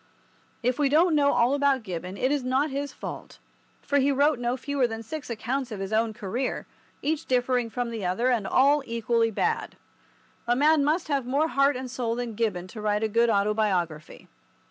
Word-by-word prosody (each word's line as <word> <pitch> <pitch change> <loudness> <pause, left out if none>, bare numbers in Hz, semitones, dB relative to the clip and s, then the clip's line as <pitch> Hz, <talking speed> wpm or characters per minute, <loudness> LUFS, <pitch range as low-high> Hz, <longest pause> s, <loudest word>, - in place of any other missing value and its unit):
If 250 +4 0
we 285 -2 +3
don't 325 +4 +4
know 285 -2 +4
all 240 +3 +3
about 280 -3 +2
Gibbon 185 0 -6
it 255 +5 +1
is 290 -3 0
not 265 +4 +1
his 280 +1 -3
fault, - - -8 0.5
for 285 - +1
he 280 +1 +3
wrote 285 0 +2
no 245 +1 -1
fewer 275 0 0
than 225 0 -6
six 295 +5 -7
accounts 245 +3 -3
of 210 - -5
his 195 +2 -4
own 225 +1 +2
career, 230 +4 -3 0.4
each 315 +1 -1
differing 245 -1 +1
from 245 0 -3
the 225 -3 -5
other, 190 +8 +1
and 220 -6 0
all 285 +3 +4
equally 230 0 +1
bad. 220 - -2 0.7
A 240 - +3
man 295 +2 +4
must 315 +4 0
have 275 -4 0
more 290 +5 +1
heart 275 -1 +3
and 255 +1 -4
soul 235 -3 -2
than 240 -1 -4
Gibbon 210 -5 -1
to 215 - -8
write 210 0 0
a - - +2
good 230 +2 +2
autobiography. 200 -7 -1
245 Hz, 195 wpm, -26 LUFS, 220-280 Hz, 0.7 s, don't